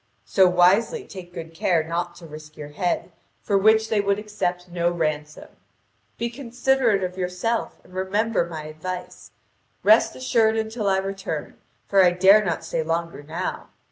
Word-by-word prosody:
So 190 Hz, -2 st, +4 dB
wisely 185 Hz, -, +3 dB
take 180 Hz, -2 st, -10 dB
good 165 Hz, -1 st, -8 dB
care 165 Hz, 0 st, +1 dB
not 170 Hz, +2 st, -3 dB
to 170 Hz, -, -12 dB
risk 155 Hz, -1 st, -12 dB
your 150 Hz, -1 st, -8 dB
head, 175 Hz, +4 st, -2 dB, 0.3 s
for 205 Hz, -, 0 dB
which 220 Hz, +2 st, +4 dB
they 215 Hz, -2 st, +2 dB
would 200 Hz, 0 st, +1 dB
accept 180 Hz, -4 st, -3 dB
no 175 Hz, -1 st, 0 dB
ransom. 155 Hz, -3 st, -3 dB, 0.7 s
Be 235 Hz, -, -1 dB
considerate 245 Hz, -4 st, +1 dB
of 180 Hz, +1 st, -4 dB
yourself 180 Hz, +6 st, -2 dB
and -, -, -19 dB
remember 195 Hz, +1 st, 0 dB
my 160 Hz, -2 st, -6 dB
advice. 175 Hz, +4 st, -7 dB, 0.5 s
Rest 215 Hz, +2 st, +5 dB
assured 225 Hz, -3 st, +2 dB
until 220 Hz, -1 st, -1 dB
I 190 Hz, -, +3 dB
return, 195 Hz, 0 st, -4 dB, 0.3 s
for 195 Hz, -1 st, +5 dB
I 180 Hz, -, +6 dB
dare 190 Hz, +4 st, +5 dB
not 170 Hz, -5 st, -2 dB
stay -, -, -1 dB
longer 165 Hz, 0 st, -3 dB
now. 160 Hz, +5 st, -5 dB
185 Hz, 160 wpm, -23 LUFS, 170-215 Hz, 0.7 s, I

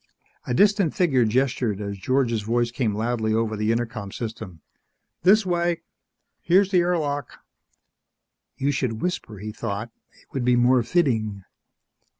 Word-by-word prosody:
A 125 Hz, -, 0 dB
distant 200 Hz, -1 st, +3 dB
figure 135 Hz, -10 st, +3 dB
gestured 120 Hz, -2 st, 0 dB
as 100 Hz, -1 st, -4 dB
George's 120 Hz, +2 st, 0 dB
voice 120 Hz, +2 st, 0 dB
came 115 Hz, -4 st, -1 dB
loudly 110 Hz, 0 st, 0 dB
over 110 Hz, -1 st, 0 dB
the 105 Hz, +1 st, 0 dB
intercom 115 Hz, -4 st, -3 dB
system, 110 Hz, -8 st, -7 dB, 0.6 s
"This 205 Hz, +3 st, +5 dB
way. 175 Hz, -1 st, 0 dB, 0.6 s
Here's 190 Hz, +3 st, +3 dB
the 185 Hz, -, +4 dB
air 175 Hz, 0 st, +2 dB
lock!" 145 Hz, -2 st, -3 dB, 1.2 s
You 140 Hz, +2 st, +1 dB
should 125 Hz, -5 st, -2 dB
whisper, 175 Hz, -, -3 dB
he 105 Hz, +2 st, -6 dB
thought. 105 Hz, 0 st, -4 dB, 0.3 s
_It -, -, -26 dB
would 135 Hz, -, -2 dB
be 125 Hz, 0 st, +3 dB
more 120 Hz, +1 st, +4 dB
fitting. 110 Hz, -, 0 dB
120 Hz, 145 wpm, -24 LUFS, 110-145 Hz, 1.2 s, This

